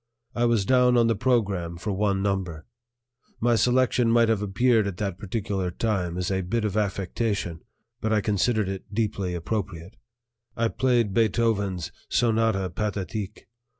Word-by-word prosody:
I 120 - +1
was 115 -4 +2
down 125 0 +4
on 120 - +5
the 115 0 +2
program 100 -8 0
for 105 +5 -3
one 100 0 0
number. 95 -6 -2 0.7
My 120 +1 +2
selection 125 +1 +3
might 115 0 +4
have 110 -3 +1
appeared 110 +2 +2
at 95 -3 -5
that 95 -3 -3
particular 100 -2 -2
time 90 -3 -1
as 90 +1 -2
a 95 0 0
bit 110 +5 -1
of 105 -2 -2
affectation, 100 -3 -2 0.4
but 110 - -1
I 110 - +3
considered 105 +1 +1
it 95 +1 -6
deeply 100 -4 -1
appropriate; 90 0 -4 0.6
I 115 0 +1
played 120 -6 +1
Beethoven's 105 -6 +1 0.2
"Sonata 110 -5 +1
Pathétique." 105 -1 -3
105 Hz, 150 wpm, -25 LUFS, 95-115 Hz, 0.7 s, on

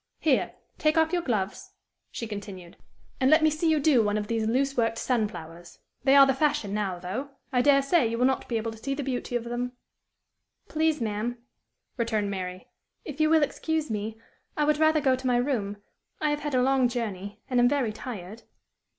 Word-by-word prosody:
"Here! 290 -5 +1 0.2
take 310 +1 +2
off 320 +1 +3
your 350 - +2
gloves," 215 - -3 0.4
she 230 - -5
continued, 200 -5 -8 0.4
"and 260 - +3
let 310 +1 +5
me 310 - +5
see 310 +2 0
you 310 -1 +3
do 280 -4 +4
one 210 -1 +1
of 210 - -2
these 225 0 -1
loose 270 +4 +1
worked 230 -1 +1
sunflowers. 175 -9 -3 0.3
They 270 0 +6
are 275 -1 +9
the 270 - +2
fashion 290 -7 0
now, 200 -4 -1
though. 190 +11 -5 0.2
I 250 - +4
dare 275 +1 +5
say, 275 -3 +3
you 230 +1 -2
will 250 - +3
not 265 0 0
be 235 - -1
able 225 +1 -3
to 225 - -11
see 275 +4 -3
the 285 - -3
beauty 250 -2 -3
of 240 - 0
them." 240 +1 -3 0.9
"Please, 315 0 +1
ma'am," 225 +2 -2 0.6
returned 220 -4 0
Mary, 185 -1 -5 0.4
"if 300 0 -5
you 310 - +4
will 320 -1 +5
excuse 315 -1 -2
me, 215 +1 -4 0.4
I 300 - +2
would 300 0 +2
rather 315 -1 +4
go 265 -2 +3
to 260 0 -4
my 245 -1 +3
room. 235 -6 -1 0.4
I 305 -1 +1
have 295 - -1
had 295 -2 -3
a 250 - +3
long 265 -1 +3
journey, 205 -4 -4
and 250 -1 +1
am 245 0 +5
very 265 -6 0
tired." 215 -2 -8
245 Hz, 205 wpm, -27 LUFS, 215-285 Hz, 0.9 s, are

